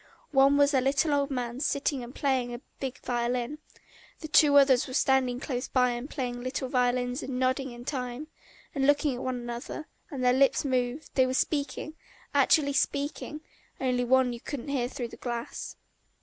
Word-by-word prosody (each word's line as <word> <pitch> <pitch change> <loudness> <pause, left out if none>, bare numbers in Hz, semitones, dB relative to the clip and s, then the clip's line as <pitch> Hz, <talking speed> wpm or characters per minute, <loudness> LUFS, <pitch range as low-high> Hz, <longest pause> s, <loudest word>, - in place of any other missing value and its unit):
One 275 0 +5
was 285 +1 +4
a 265 - +4
little 285 +4 +2
old 280 0 +1
man 245 -2 -3
sitting 280 -2 0
and 240 +2 -10
playing 260 -4 0
a 240 - -9 0.2
big 265 0 -4
violin, 245 +3 -1 0.6
the 310 - -5
two 300 -2 +6
others 270 -3 +5
were 255 - -6
standing 265 -3 +2
close 250 -2 -3
by 250 -1 +2
and 240 +4 -5
playing 245 -5 -4
little 255 +1 -3
violins 250 +1 +1
and 255 -1 -4
nodding 260 +1 0
in 240 0 -10
time, 250 0 -4 0.5
and 270 -1 +1
looking 290 -1 +3
at 245 - -5
one 255 -1 -2
another, 240 +5 -6 0.2
and 265 -3 -4
their 250 0 +5
lips 275 +2 +3
moved, 255 +2 -1
they 260 -1 +4
were 255 - -1
speaking, 295 +2 -1 0.4
actually 285 -3 +4
speaking, 290 +2 -1 0.4
only 250 -2 +1
one 250 -1 +2
couldn't 280 +1 -6
hear 260 -4 0
through 245 -2 -5
the - - -11
glass. 235 -1 -5
260 Hz, 175 wpm, -28 LUFS, 245-280 Hz, 0.6 s, two